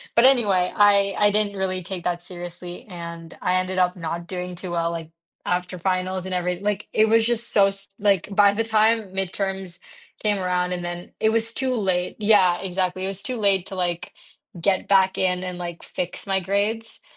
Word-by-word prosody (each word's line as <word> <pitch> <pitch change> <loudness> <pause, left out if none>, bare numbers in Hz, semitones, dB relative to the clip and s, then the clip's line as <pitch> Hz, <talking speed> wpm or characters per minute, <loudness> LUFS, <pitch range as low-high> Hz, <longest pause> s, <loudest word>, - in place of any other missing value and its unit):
but 235 - +6
anyway, 205 -9 +4
I 200 -1 +5
I 205 - +4
didn't 205 -1 0
really 185 -1 -1
take 180 0 -5
that 175 -1 -1
seriously 175 0 -7
and 170 -1 -8
I 180 0 +2
ended 185 0 -3
up 180 0 +2
not 170 0 -5
doing 180 -1 -5
too 180 0 -6
well, 170 -1 0
like, 165 -1 -6 0.3
after 180 +1 -1
finals 185 +1 -1
and 190 - -4
every 180 0 -1
like, 205 0 -2
it 220 - +4
was 225 0 +4
just 235 0 0
so 200 -1 +5
s 195 0 -5
like, 200 -4 +2
by 200 -1 +6
the 225 - 0
time 220 -2 +2
midterms 190 -1 -3 0.4
came 210 -1 +3
around 180 -1 0
and 175 -1 -4
then, 175 0 -6
it 220 - +3
was 230 +1 +1
too 260 -1 0
late 185 -5 0
yeah, 200 -5 +4
exactly, 185 0 -2
it - - -1
was 195 0 -1
too 255 -2 -3
late 200 -4 +2
to, 195 - -6
like, 175 -2 -2 0.5
get 190 +2 +1
back 190 -1 +4
in 180 -1 0
and, 180 -1 -5
like, 175 -1 -6
fix 180 0 -5
my 195 0 +1
grades 205 +4 -2
190 Hz, 200 wpm, -23 LUFS, 180-205 Hz, 0.5 s, but